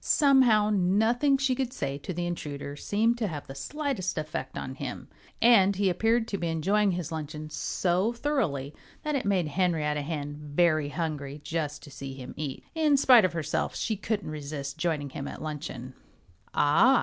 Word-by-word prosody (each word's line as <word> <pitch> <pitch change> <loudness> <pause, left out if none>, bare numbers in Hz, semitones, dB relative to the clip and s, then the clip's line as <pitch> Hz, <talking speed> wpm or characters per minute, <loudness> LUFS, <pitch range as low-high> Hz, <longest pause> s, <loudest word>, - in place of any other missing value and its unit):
Somehow 250 -8 +5
nothing 220 +9 +3
she 270 -1 +1
could 255 -1 -2
say 140 - -3
to 145 - -6
the 175 0 -2
intruder 145 -4 -5
seemed 225 +9 +1
to 220 - 0
have 150 -5 -5
the 135 - -8
slightest 220 - -3
effect 155 -3 -4
on 130 - -4
him. 135 -1 -6 0.3
And 200 -4 +6
he 195 -1 +2
appeared 225 +5 +2
to 200 - -2
be 170 - -1
enjoying 195 +5 +2
his 175 -3 -4
luncheon 155 -1 -5
so 185 +6 0
thoroughly 235 - -1 0.3
that 300 - -1
it 275 -5 -1
made 185 -6 +1
Henrietta 155 -3 +1
Hen 145 -1 -4 0.2
very 155 -4 +3
hungry 150 -3 -4
just 155 -2 -3
to 145 - -12
see 135 0 -7
him 130 -2 -8
eat. 145 -3 -5
In 310 -3 +3
spite 250 -6 +7
of 180 - -1
herself 155 -2 -2
she 220 - -1
couldn't 205 -4 -3
resist 140 -2 -5
joining 150 -5 -1
him 140 +1 -5
at - - -7
luncheon. 150 -5 -6 0.6
"Ah!" 230 - +5
170 Hz, 175 wpm, -28 LUFS, 145-220 Hz, 0.6 s, spite